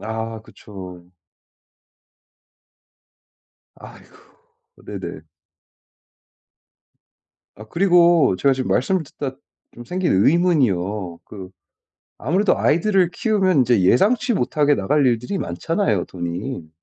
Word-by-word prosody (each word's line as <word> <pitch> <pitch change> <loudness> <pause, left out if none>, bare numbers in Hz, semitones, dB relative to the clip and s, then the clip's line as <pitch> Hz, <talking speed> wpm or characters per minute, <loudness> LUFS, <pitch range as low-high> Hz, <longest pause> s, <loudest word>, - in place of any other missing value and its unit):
아. 110 0 -5
그쵸. 90 -5 -12 2.7
아이고. - - -15 0.7
네네. - - -7 2.4
아 110 - -10
그리고 170 - +3
제가 140 +7 +2
지금 130 -1 -3
말씀을 180 +8 +1
듣다 135 -1 -6 0.4
좀 120 - -11
생긴 185 0 -1
의문이요. 105 - +1
그 95 -3 -10 0.7
아무래도 185 - +1
아이들을 180 +1 +2
키우면 195 -7 +1
인제 120 -4 +3
예상치 215 - +2
못하게 145 0 +1
나갈 140 +7 +1
일들이 125 - -1
많잖아요 105 - -1
돈이. 85 +2 -6
130 Hz, 210 characters per minute, -20 LUFS, -, 2.7 s, 그리고